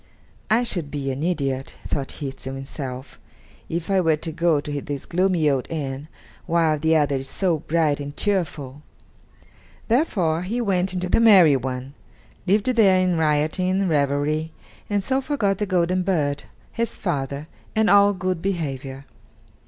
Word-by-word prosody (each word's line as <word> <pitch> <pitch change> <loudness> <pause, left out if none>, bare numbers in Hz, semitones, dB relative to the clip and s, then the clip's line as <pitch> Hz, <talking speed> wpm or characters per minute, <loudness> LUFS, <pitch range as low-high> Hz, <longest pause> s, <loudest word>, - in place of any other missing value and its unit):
"I 230 +3 +4
should 175 -10 -2
be 140 -2 -3
an 130 +2 -5
idiot," 140 -6 -2
thought 140 -2 -3
he 140 -3 -5
to 135 0 -7
himself, 135 -1 -7 0.5
"if 170 +3 -3
I 190 -1 +4
were 165 -3 +3
to 160 +2 -5
go 165 -1 +2
to 145 0 -4
this 140 -1 -5
gloomy 180 -3 +1
old 135 -3 +1
inn 145 -2 -4 0.4
while 165 -3 +2
the 160 +2 +2
other 145 -3 +2
is 135 0 -6
so 175 -5 0
bright 155 -2 +1
and 145 0 -7
cheerful." 155 -9 -2 1.1
Therefore, 190 - +1
he 210 +7 -2
went 190 -5 +1
into 180 0 -2
the 180 - +3
merry 190 -10 +7
one, 130 +1 -4 0.5
lived 205 +2 +3
there 220 -7 +4
in 185 -1 +2
rioting 155 +4 +1
and 190 0 +1
revelry, 150 +2 0 0.4
and 205 -1 0
so 265 +5 +1
forgot 215 -9 0
the 210 - -1
golden 185 0 +1
bird, 150 -6 0 0.3
his 230 0 -2
father, 140 -4 -3 0.3
and 220 -1 +3
all 200 +1 +6
good 185 -3 -2
behavior. 140 -7 -3
160 Hz, 160 wpm, -23 LUFS, 145-190 Hz, 1.1 s, merry